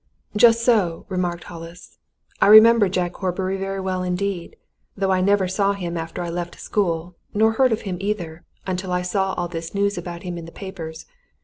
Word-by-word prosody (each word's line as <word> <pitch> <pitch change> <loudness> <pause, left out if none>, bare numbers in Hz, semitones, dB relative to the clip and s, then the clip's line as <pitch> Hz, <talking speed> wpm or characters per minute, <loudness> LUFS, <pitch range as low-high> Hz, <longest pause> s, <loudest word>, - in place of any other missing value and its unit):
"Just 230 +1 +5
so!" 200 -9 +2
remarked 175 -2 -2
Hollis. 170 0 -11 0.4
"I - - +6
remember 215 0 +8
Jack 180 -1 -1
Horbury 190 0 -2
very 195 0 -3
well 185 -1 -2
indeed, 180 0 -3 0.4
though 195 0 +1
I 185 -1 +2
never 195 0 +3
saw 195 +2 +1
him 175 -3 -4
after 165 +1 -4
I 170 - -4
left 175 0 -5
school, 175 -4 -1 0.2
nor 220 +1 +4
heard 255 +2 +3
of 220 - 0
him 190 -4 -4
either, 180 -5 -3 0.2
until 185 0 -3
I 180 0 0
saw 190 +1 0
all 175 - -2
this 165 +1 -6
news 200 -1 +1
about 170 0 -7
him 175 -2 -5
in 165 - -8
the 165 - -10
papers. 165 -5 -8
185 Hz, 190 wpm, -22 LUFS, 175-200 Hz, 0.4 s, remember